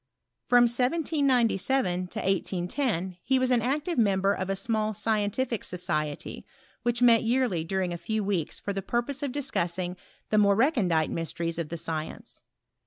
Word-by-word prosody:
From 245 0 +6
1797 250 - +1
to - - -6
1810 185 - -1
he 265 +6 +2
was 255 0 +1
an 245 -2 +4
active 290 +5 -1
member 195 -2 +3
of 190 -1 -3
a 195 - +1
small 215 +1 -1
scientific 215 +2 0
society, 155 -5 -3 0.4
which 240 0 0
met 230 -2 +6
yearly 235 -8 +1
during 185 +1 -1
a 170 - -5
few 220 +2 -2
weeks 195 -6 -1
for 200 - -3
the 195 - -3
purpose 240 +7 -2
of 285 -3 -2
discussing 180 -10 -2 0.4
the 215 - +4
mc»*e 200 -1 +5
re 260 +9 +4
eoadite 175 - +1
mysteries 165 0 -3
of 160 -3 -3
the 170 - -4
science. 160 -1 -5
205 Hz, 160 wpm, -27 LUFS, 180-250 Hz, 0.4 s, From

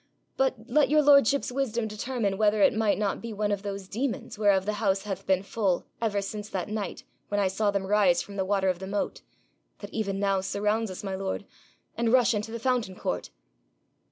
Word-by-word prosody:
But 265 -1 +2
let 290 +4 +3
your 305 +1 +4
lordship's 280 -2 +5
wisdom 240 -4 -1
determine 210 -2 -2
whether 210 -1 +3
it - - +5
might 220 -2 +2
not 205 -2 -1
be 230 -1 -6
one 210 0 -1
of 200 -1 -1
those 200 -2 -5
demons 240 +5 -3
whereof 200 -3 +3
the 210 - 0
house 195 -2 +1
hath 195 -2 -5
been 190 0 +2
full 195 -3 0 0.2
ever 205 -3 0
since 210 +1 -6
that 190 +1 -3
night 210 -2 -4 0.2
when 205 - -1
I 200 - +3
saw 205 +3 0
them 200 -1 -1
rise 195 -3 +4
from 200 - -6
the 195 - 0
water 195 0 +1
of 180 -2 -1
the 190 - -6
moat 200 +1 -2 0.6
that - - -10
even 200 -3 -2
now 195 -1 +1
surrounds 210 +3 0
us, 185 - -7
my 195 -1 -3
lord! 190 0 -3 0.5
and 230 -1 +1
rush 245 -1 +5
into 210 +1 -3
the 230 - -3
fountain 235 -5 0
court.' 90 - -3
205 Hz, 210 wpm, -27 LUFS, 195-225 Hz, 0.6 s, lordship's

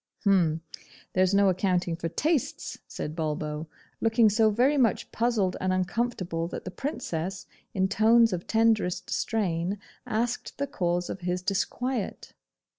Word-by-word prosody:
'H'm! 170 -6 +3 0.5
there's 185 0 +3
no 200 0 +5
accounting 180 -2 +1
for 165 0 -3
tastes,' 295 - -1
said 150 - -5
Bulbo, 155 -1 -3 0.3
looking 225 -1 +4
so 220 +1 +4
very 250 +7 +3
much 240 -7 +1
puzzled 225 -6 +1
and 185 - +1
uncomfortable 185 -3 -1
that - - -7
the 185 - -5
Princess, 185 - -4 0.3
in 190 -1 +2
tones 225 +2 +5
of 175 -1 -4
tenderest 220 -5 +2
strain, 190 -3 0 0.3
asked 240 +1 -2
the 280 - 0
cause 175 -7 -1
of - - -5
his 180 0 -2
disquiet. 230 +4 -2
190 Hz, 135 wpm, -27 LUFS, 175-225 Hz, 0.5 s, no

